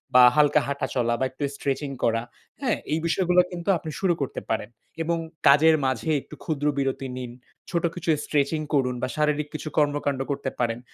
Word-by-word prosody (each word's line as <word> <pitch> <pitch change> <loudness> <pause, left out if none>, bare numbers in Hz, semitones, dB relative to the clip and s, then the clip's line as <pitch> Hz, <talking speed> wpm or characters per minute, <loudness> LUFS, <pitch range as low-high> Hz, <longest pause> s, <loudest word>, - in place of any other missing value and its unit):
বা 125 - +9
হালকা 150 -1 +5
হাঁটা 140 0 -2
চলা 120 -1 +2
বা 130 - +2
একটু 135 +3 -6
স্ট্রেচিং 140 +1 -2
করা। 115 0 +2 0.4
হ্যাঁ, 245 -5 +1 0.2
এই 160 - +1
বিষয়গুলো 180 +1 +3
কিন্তু 175 +1 -4
আপনি 160 - -7
শুরু 190 -3 +2
করতে 135 - -3
পারেন। 110 -1 -1 0.3
এবং 170 +1 0 0.3
কাজের 155 +3 +7
মাঝে 130 +5 -1
একটু - - -12
ক্ষুদ্র 150 -2 -1
বিরতি 135 -1 -1
নিন। 125 -2 -5 0.4
ছোট 170 -2 -1
কিছু 170 -1 -4 0.2
স্ট্রেচিং 150 +1 +1
করুন 125 -3 +2
বা - - 0
শারীরিক 150 -1 +1
কিছু 155 0 -5
কর্মকান্ড 145 -2 +1
করতে 140 -1 -2
পারেন। 115 -1 0
145 Hz, 180 wpm, -25 LUFS, 130-160 Hz, 0.4 s, বা